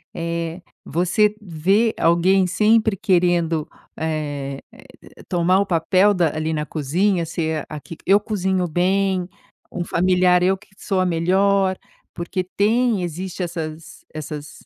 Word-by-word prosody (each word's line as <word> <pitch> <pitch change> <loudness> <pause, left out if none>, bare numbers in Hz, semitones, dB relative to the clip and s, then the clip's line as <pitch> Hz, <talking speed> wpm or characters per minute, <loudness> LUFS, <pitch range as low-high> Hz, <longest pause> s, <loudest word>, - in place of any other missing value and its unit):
Eh, 170 +1 -3 0.2
você 180 +5 +2
vê 195 +5 +1
alguém 180 +3 +3
sempre 215 +3 +3
querendo, 175 -5 +1 0.3
eh 145 -3 -3 0.4
eh, - - -17
tomar 180 +1 +2
o 200 - +1
papel 185 +3 +3
da 170 -5 +1
ali 155 +1 -2
na 150 -1 -2
cozinha? 170 +5 0
Ser 160 -2 -3
a 150 - -6
que: 165 - -10
"Eu 195 +2 +5
cozinho 190 -3 -1
bem", 185 +2 +1 0.4
um 180 - -3
familiar: 180 0 +3
"Eu 190 +1 +2
que - - -22
sou 195 -2 -2
a 185 - +2
melhor", 190 +3 +2 0.4
porque 175 +2 -3
tem, 215 +2 +1
existe 180 +2 -4
essas 165 -1 -6
essas 150 0 -8
180 Hz, 135 wpm, -21 LUFS, 165-190 Hz, 0.4 s, Eu